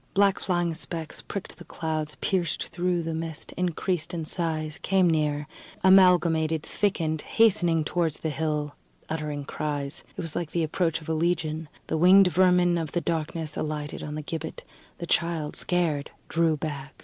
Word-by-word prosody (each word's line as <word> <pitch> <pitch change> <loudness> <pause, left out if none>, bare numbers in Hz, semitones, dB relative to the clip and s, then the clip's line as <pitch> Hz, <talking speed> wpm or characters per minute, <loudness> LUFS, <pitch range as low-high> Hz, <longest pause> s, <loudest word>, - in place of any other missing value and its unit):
Black 200 -1 +4
flying 175 -3 0
specks 160 0 -6
pricked 190 -4 -7
the - - -9
clouds, 155 -2 -3
pierced 175 -4 0
through 175 0 0
the 165 0 -3
mist, 160 -1 -5
increased 175 -1 -1
in 165 -2 -3
size, 160 0 -2
came 190 -2 +3
near, 150 -2 +1 0.4
amalgamated, 170 -4 +5
thickened, 165 -7 -1
hastening 180 -8 +3
towards 165 -1 -1
the 160 - -1
hill, 150 0 -1 0.4
uttering 150 -2 -3
cries. 145 +1 -3
It - - -2
was 165 -2 -4
like 170 -3 -2
the 170 - +1
approach 165 +1 0
of 155 - -10
a - - +1
Legion. 160 -1 -1 0.2
The - - -1
winged 185 +2 +7
vermin 180 -1 +4
of 160 -3 -4
the 175 - +1
darkness 160 -1 -2
alighted 150 -1 -3
on 150 0 -5
the 155 - -4
gibbet; 160 +1 -5 0.3
the 170 - -5
child, 165 -3 0
scared, 165 -5 0 0.2
drew 165 -1 +2
back. 145 -2 -5
165 Hz, 160 wpm, -27 LUFS, 155-175 Hz, 0.4 s, winged